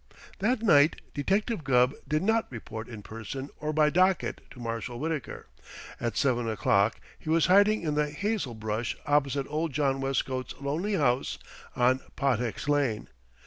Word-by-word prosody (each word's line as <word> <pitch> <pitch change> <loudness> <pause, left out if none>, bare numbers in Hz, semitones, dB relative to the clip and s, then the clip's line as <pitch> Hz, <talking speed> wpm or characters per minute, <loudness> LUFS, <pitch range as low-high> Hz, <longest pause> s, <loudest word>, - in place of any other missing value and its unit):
That 225 +3 +1
night 155 -7 +5
Detective 195 - 0
Gubb 125 -1 +3
did 155 +2 0
not 225 -2 +1
report 110 -2 -7
in 110 -4 -8
person 115 +6 -7
or 155 0 -2
by 150 0 +3
docket 185 +2 +2
to 125 - -13
Marshal 115 +1 -4
Wittaker. 155 -3 -4 0.5
At 115 -2 -2
seven 120 -4 +1
o'clock 105 -1 +2 0.2
he - - -8
was 165 0 +4
hiding 200 +2 +5
in 155 -2 0
the 150 0 +1
hazel 190 - -2
brush 110 +1 -3
opposite 140 -1 +1
old 155 0 -2
John 135 -1 +1
Westcote's 130 -2 -2
lonely 155 +9 -2
house 130 -6 +1 0.4
on 125 +1 +3 0.2
Pottex 125 -2 -1
Lane. 140 - 0
140 Hz, 150 wpm, -28 LUFS, 120-160 Hz, 0.5 s, night